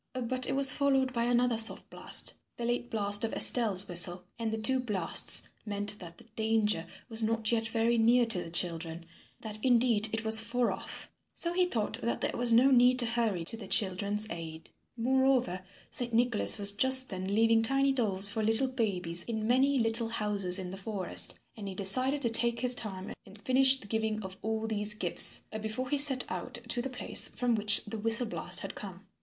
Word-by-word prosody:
But 255 +1 -2
it - - -2
was 275 -1 +6
followed 270 -2 -1
by 235 -1 -2
another 245 -1 +1
soft 225 - +1
blast - - -1 0.2
the 235 - -6
late 240 0 -4
blast 205 -3 +1
of 225 - -4
Estelle's 205 -5 +4
whistle 175 0 +2 0.2
and 225 -1 -4
the 220 - -4
two 260 +4 -1
blasts 210 -9 +3
meant 205 0 -4
that 170 -2 -13
the - - -16
danger 215 -6 -1 0.2
was 225 -2 0
not 225 0 -1
yet 225 -1 -2
very 230 +1 -1
near 240 +2 +2
to 210 -6 0
the - - -11
children, 165 -1 -3 0.4
that 215 -1 -9
indeed 235 -3 +1
it 225 0 -5
was 220 0 +6
far 235 +2 -2
off, - - -7 0.2
so 340 0 -2
he 365 0 +1
thought 225 -4 -5
that 235 - -4
there - - -4
was 240 0 +1
no 250 +4 +3
need 250 0 +3
to 245 - +2
hurry 230 -6 -2
to 185 - -6
the 220 -4 -11
children's 200 +1 0
aid. 160 -1 -10 0.3
Moreover, 255 -5 -1 0.3
Saint 240 -2 -4
Nicholas 240 -2 +1
was 200 -1 +6
just 260 +5 +3
then 190 +1 -5
leaving 225 0 +2
tiny 275 +4 0
dolls 200 -6 -3
for 220 +2 -3
little 225 +5 +2
babies 185 -9 0
in 220 -2 -5
many 265 +4 +1
little 225 -1 0
houses 205 -5 +1
in 185 -2 -5
the 190 - -9
forest 195 -2 0 0.2
and 210 -3 -9
he 190 - -8
decided 255 +9 +1
to 235 - 0
take 235 +1 +2
his 250 0 +5
time 195 -5 -4
and 195 +2 -16
finish 265 +1 +3
the 245 - -12
giving 220 0 -4
of 190 0 -10
all 220 0 -4
these 210 -1 0
gifts 180 -5 +3 0.2
before 220 +5 -6
he 290 - +1
set 275 -3 +4
out 250 - -8
to 235 0 -3
the 270 - -6
place 250 - +3
from 245 -1 -3
which 210 -2 +1
the 215 +1 -8
whistle 225 +3 +2
blast 225 - 0
had - - -8
come. - - -11
225 Hz, 200 wpm, -28 LUFS, 205-245 Hz, 0.4 s, was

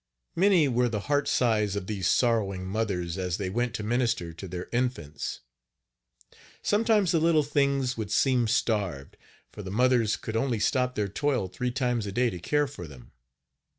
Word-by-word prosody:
Many 185 -4 +4
were 125 -1 +1
the 105 -3 -2
heart 145 +4 0
sighs 105 -5 +1
of 100 - -3
these 95 -3 -2
sorrowing 100 -6 +1
mothers 95 -4 -2
as 90 -1 -2
they 95 -3 -3
went 120 +2 -1
to 105 - -4
minister 115 -7 0
to 90 +4 -8
their 90 0 -6
infants. 120 - -3 1.2
Sometimes 210 -3 +2
the 165 - +3
little 160 -1 +3
things 140 -3 0
would 110 -3 -4
seem 125 +1 +2
starved, 105 - -1 0.4
for - - -9
the 95 - -7
mothers 120 +1 +2
could 110 - -6
only 115 -1 0
stop 125 +3 +1
their 105 -1 0
toil 125 0 -1
three 110 +7 -3
times 125 -4 -1
a - - -4
day 120 +3 +1
to 90 - -6
care 145 - +1
for 135 - -8
them. 65 -5 -14
115 Hz, 175 wpm, -27 LUFS, 95-130 Hz, 1.2 s, Many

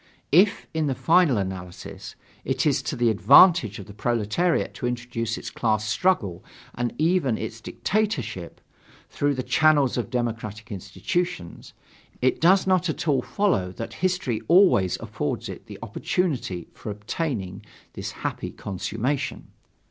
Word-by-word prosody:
If, 190 +7 +4
in 160 -2 0
the 135 - 0
final 165 -3 +4
analysis, 95 -2 -6 0.3
it - - -1
is - - +2
to - - -3
the 120 -1 +3
advantage 130 - +6
of 100 - -8
the 105 - -12
proletariat 120 - 0
to 125 - -3
introduce 120 -2 -3
its - - -7
class 110 -2 0
struggle 110 - +1 0.3
and 120 0 -3
even 155 -7 +2
its 110 +1 -6
dictatorship, 125 - -2 0.5
through 145 0 0
the 130 - -3
channels 150 -4 +3
of 120 - -3
democratic 115 -4 -3
institutions, 100 - -4 0.5
it 130 +1 +1
does 185 +4 +5
not 185 -2 +2
at 155 - -3
all 140 -3 +3
follow 185 - 0
that 115 - -6
history 180 -11 0
always 170 - +5
affords - - -3
it - - -9
the - - -9
opportunity 135 - -2
for - - -8
attaining 105 - -4 0.3
this - - -5
happy - - -4
consummation. 110 +8 -3
120 Hz, 140 wpm, -25 LUFS, 105-165 Hz, 0.5 s, advantage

